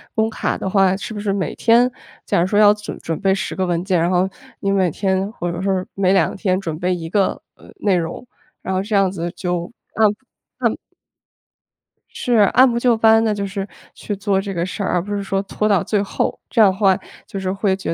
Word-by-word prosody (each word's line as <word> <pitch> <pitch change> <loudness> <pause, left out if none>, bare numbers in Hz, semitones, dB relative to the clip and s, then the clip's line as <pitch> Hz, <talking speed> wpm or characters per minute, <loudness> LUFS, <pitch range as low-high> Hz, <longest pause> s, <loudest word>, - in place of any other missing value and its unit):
工 220 0 +2
卡 225 - -2
的 - - -4
话， 190 -1 +3
是 220 - -6
不 205 - -5
是 205 -1 -1
每 195 -2 -2
天 235 +2 +4 0.4
假 - - +1
如 175 - +2
说 205 +2 +2
要 205 -1 +7
准 210 0 -8
准 165 -1 -4
备 195 -1 +3
10 195 +2 -3
个 190 - 0
文 175 -1 0
件， 190 -2 +2
然 170 - +2
后 180 +1 +2 0.3
你 200 - -1
每 190 -2 +2
天 190 +3 -1
或 175 -4 -3
者 170 +1 -5
说 190 -1 0
每 190 -1 +1
2 180 -5 +2
天 190 -2 0
准 165 -5 -5
备 180 +1 0
一 165 -2 -6
个， 195 +2 +1 0.2
呃， - - -17
内 200 -3 +3
容， 165 +5 -3 0.4
然 190 - -2
后 185 - +1
这 210 +1 -2
样 195 -2 +3
子 175 -2 -4
就 175 0 -3 0.2
按 220 -1 +4 0.6
按 - - -1 1.3
是， 245 - -2 0.2
按 260 +2 +6
部 235 - -1
就 240 -1 +3
班 225 0 +5
的， 220 -1 +1
就 200 -1 -3
是 195 0 -4 0.3
去 205 - -5
做 200 -1 0
这 195 0 -4
个 170 -1 -1
事 190 +2 -4
儿， - - -1
而 180 - +2
不 205 +3 -4
是 200 - -3
说 195 0 -1
拖 210 +2 -2
到 200 -4 +3
最 210 -2 0
后， 200 - -2
这 230 - +3
样 200 -3 +7
的 190 - -8
话 195 -3 +4 0.3
就 195 - -6
是 185 -1 -2
会 195 0 0
觉 190 - -6
195 Hz, 250 characters per minute, -20 LUFS, 185-210 Hz, 1.3 s, 要